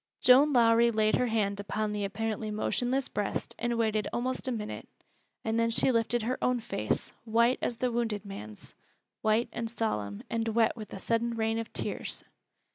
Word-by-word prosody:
Joan 270 +4 +6
Lowrie 235 -2 +5
laid 215 -1 +2
her 250 - +1
hand 205 -3 0
upon 210 +1 -2
the 205 -1 -2
apparently 215 +2 -3
motionless 245 +5 0
breast 205 -1 -3
and 240 0 0
waited 220 -2 +1
almost 255 +2 -2
a - - 0
minute, 215 -3 -5 0.6
and 225 +1 +1
then 230 0 +2
she 230 +3 +4
lifted 230 0 +1
her 255 +3 -1
own 250 -1 +2
face, 220 - -2
white 235 +2 +3
as 235 - -1
the 250 +1 0
wounded 225 -3 -1
man's 105 - -9 0.5
white 220 +2 +2
and 230 -1 -3
solemn, 105 - -3
and 230 0 -2
wet 225 0 +2
with 215 -3 -9
a - - -6
sudden 230 +3 0
rain 225 0 0
of 230 - -5
tears. - - -3
225 Hz, 180 wpm, -29 LUFS, 215-240 Hz, 0.6 s, Joan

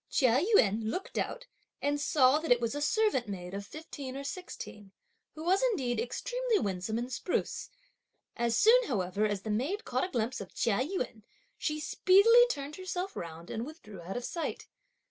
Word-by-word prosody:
Chia 255 -3 +4 0.2
Yün 215 +2 +2
looked 370 +11 -3
out, - - -3 0.3
and 290 0 0
saw 280 -1 +4
that 320 -3 -3
it 245 - +6
was 230 0 -1
a 290 - -3
servant 410 - +2
maid 180 -2 -6
of 200 +1 -4
fifteen 280 -3 -7
or 280 - -5
sixteen, 275 - -7 0.4
who 310 - -7
was 375 +3 +3
indeed 270 - +1
extremely - - -1
winsome 200 - -2
and 245 +2 -4
spruce. 355 - -2 0.7
As 235 -1 +1
soon 475 - +6
however 200 -2 0
as 205 -2 -3
the 220 - -3
maid 290 - -1
caught - - 0
a 370 - -2
glimpse 240 - -2
of 190 - -10
Chia 215 -2 +1
Yün, 255 - -2 0.3
she 305 -1 -2
speedily 400 +10 +6
turned 285 -5 -4
herself 370 +1 -4
round 165 0 -7
and 225 - -3
withdrew 235 - -10
out 185 +7 -5
of 245 - -4
sight. 335 - -4
260 Hz, 180 wpm, -31 LUFS, 220-360 Hz, 0.7 s, it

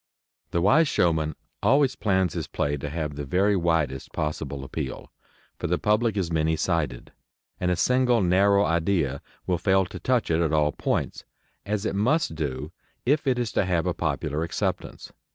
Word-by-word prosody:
The 85 - 0
wise 150 - +5
showman 80 - +1 0.3
always 135 +4 +3
plans 95 -5 +1
his - - -4
play 70 0 -1
to 75 +1 -5
have 75 -1 -3
the 75 - -4
very 95 +8 +2
widest 80 -7 0
possible 75 -3 -3
appeal, 65 -1 -6 0.5
for - - -2
the 90 - +1
public 105 +2 +1
is 90 -4 -1
many 80 0 +2
sided, 80 -7 -2 0.5
and 90 - 0
a 90 - +2
single 125 +3 +3
narrow 100 +3 +4
idea 85 -5 0 0.2
will 90 -2 0
fail 95 -1 +3
to - - -8
touch 125 -8 +1
it 80 +1 +2
at 80 -2 +1
all 75 -1 +3
points, - - -2 0.4
as 105 0 -1
it - - -1
must 120 - +1
do 75 -1 -4 0.3
if 145 +3 +2
it 130 -2 +2
is 120 -3 -1
to - - +1
have 90 -3 0
a - - 0
popular 75 +3 -2
acceptance. 85 - -3
85 Hz, 175 wpm, -25 LUFS, 75-105 Hz, 0.5 s, wise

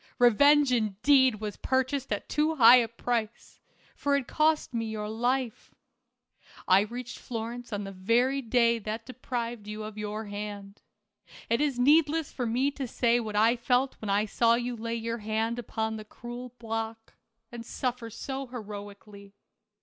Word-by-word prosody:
Revenge, 285 +4 +5
indeed, 245 +3 +3
was 210 -2 -5
purchased 260 0 -1
at 205 - -2
too 305 +2 +1
high 250 -2 +9
a 235 -2 +2
price, 230 0 -4 0.4
for 285 0 +1
it 280 - +2
had 250 - -15
cost 310 -3 +1
me 230 -1 -1
your 215 -1 -4
life. 240 +2 -2 0.9
I 185 +1 +6
reached 240 +4 -5
Florence 235 +1 -6
on 205 -1 -3
the 195 - -6
very 235 +8 +1
day 235 -1 +2
that 220 +1 -5
deprived 240 -3 -5
you 210 0 -5
of 215 0 -7
your 210 +1 -4
hand. 205 -1 -7 0.7
It 235 - +2
is 285 -4 0
needless 300 +4 +3
for 250 -3 -3
me 255 +5 +1
to 275 -2 -5
say 235 0 +2
what 215 -3 -5
I 225 +3 +4
felt 245 +2 +1
when 215 - -4
I 205 +2 +2
saw 230 +2 +3
you 245 +1 -2
lay 230 +1 -4
your 230 0 -3
hand 220 +2 -1
upon 220 -1 -3
the 215 - -7
cruel 240 +3 -9
block, 225 -1 -5 0.4
and 235 -1 -7
suffer 245 -1 -3
so 265 +4 -5
heroically. 205 -3 -9
230 Hz, 165 wpm, -28 LUFS, 215-250 Hz, 0.9 s, high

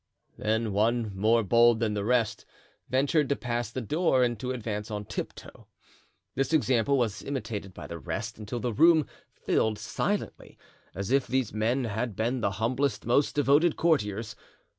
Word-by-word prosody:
Then 110 0 -1
one 110 0 +1
more 110 +4 +3
bold 115 +3 +4
than 110 -2 0
the 100 -1 -2
rest 120 0 +1 0.5
ventured 140 +3 +2
to 140 - +2
pass 120 -3 -3
the 130 +3 -4
door 135 - +2
and 120 -3 0
to 125 - -4
advance 110 -4 -4
on 105 -1 -4
tiptoe. - - -7 0.7
This 135 +4 -1
example 135 -2 +2
was 110 -6 -1
imitated 110 -8 -5
by - - -8
the 85 - -7
rest, 75 - -5
until 110 +3 -5
the 120 -1 -2
room 160 +4 +5 0.3
filled 110 -1 0
silently, 200 - -3 0.4
as 100 +5 -4
if 135 0 +2
these 130 -4 -1
men 115 +5 0
had 110 0 -3
been 120 +4 -1
the 100 - 0
humblest, 120 +1 -1
most 130 +5 +2
devoted 145 +4 +3
courtiers. 110 - 0
120 Hz, 160 wpm, -28 LUFS, 105-130 Hz, 0.7 s, room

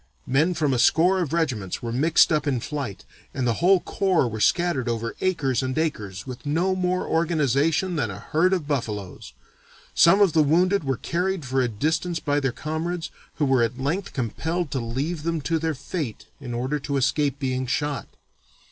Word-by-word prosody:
Men 155 +7 +2
from 150 -4 +1
a 125 - 0
score 180 +8 +4
of 170 -6 -2
regiments 125 - -1
were 115 - -3
mixed 155 +9 +4
up 155 -1 +1
in 130 -3 +1
flight, 140 -5 -5 0.3
and 130 - -1
the 120 - +2
whole 185 +2 +5
corps 185 -7 +1
was 110 -2 -2
scattered 170 -9 +1
over 115 -1 -2
acres 150 -10 +1
and 130 +1 -3
acres 105 - -2
with 130 +1 -8
no 170 +6 +1
more 185 0 0
organization 160 +2 +1
than 120 -7 0
a 95 - -6
herd 160 - +1
of 175 -6 0
buffaloes. 105 - -4 0.6
Some 170 +4 +6
of 195 -6 +4
the 160 - +5
wounded 180 +6 +3
were 135 -3 -1
carried 180 -1 -2
for 130 +1 +1
a 125 - +2
distance 160 - -1
by 145 -1 0
their 135 -3 0
comrades, 160 +5 -4 0.2
who 150 - +1
were 135 -2 +3
at 115 +1 0
length 160 +9 -2
compelled 160 +6 -2
to 135 - -1
leave 135 +8 -3
them 165 +1 -1
to 165 +3 0
their 160 -1 -1
fate 145 - -5
in 125 -4 -6
order 130 +5 -1
to 140 0 -2
escape 140 +1 +1
being 130 -2 -2
shot. 145 +2 -2
145 Hz, 190 wpm, -24 LUFS, 130-170 Hz, 0.6 s, Some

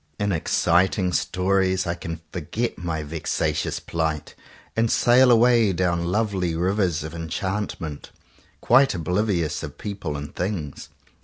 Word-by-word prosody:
In 100 0 0
exciting 90 +2 +2
stories 95 +1 +1
I 85 - -1
can 80 -2 -6
forget 105 +8 -3
my 85 -3 -3
vexa 80 +2 -1
tious - - -2
plight, 80 -2 -3 0.4
and 115 0 +2
sail 125 +2 +5
away 115 -3 +5
down 85 -1 0
lovely 95 -3 0
rivers 90 -2 0
of 80 0 -7
enchantment, 85 -1 -4 0.5
quite 135 -1 +4
oblivious 90 -1 0
of 75 -2 -8
people 100 -8 -4
and 75 0 -8
things. 90 -6 -4
90 Hz, 130 wpm, -24 LUFS, 80-105 Hz, 0.5 s, sail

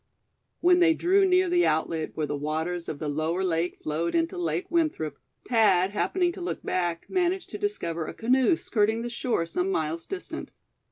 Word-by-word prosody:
When 355 0 +5
they 335 -2 +5
drew 385 +4 +3
near 370 0 +4
the 350 0 +3
outlet 160 0 -1
where 155 - 0
the 145 - -3
waters 160 +4 -3
of 150 - -4
the 150 - -4
Lower 155 +5 -1
Lake 175 -1 0
flowed 155 +3 -1
into 330 +2 +1
Lake 355 +1 -1
Winthrop, 305 - 0 0.3
Thad, 200 -6 +4
happening 350 - +1
to 355 - -9
look 355 - -4
back, 175 -2 -1
managed 365 0 0
to 210 - -5
discover 170 -6 -2
a - - -5
canoe 255 +7 +3
skirting 220 +1 0
the 240 - -4
shore 235 -7 -1
some 180 +3 -1
miles 160 -2 -2
distant. 390 -1 -6
205 Hz, 180 wpm, -27 LUFS, -, 0.3 s, When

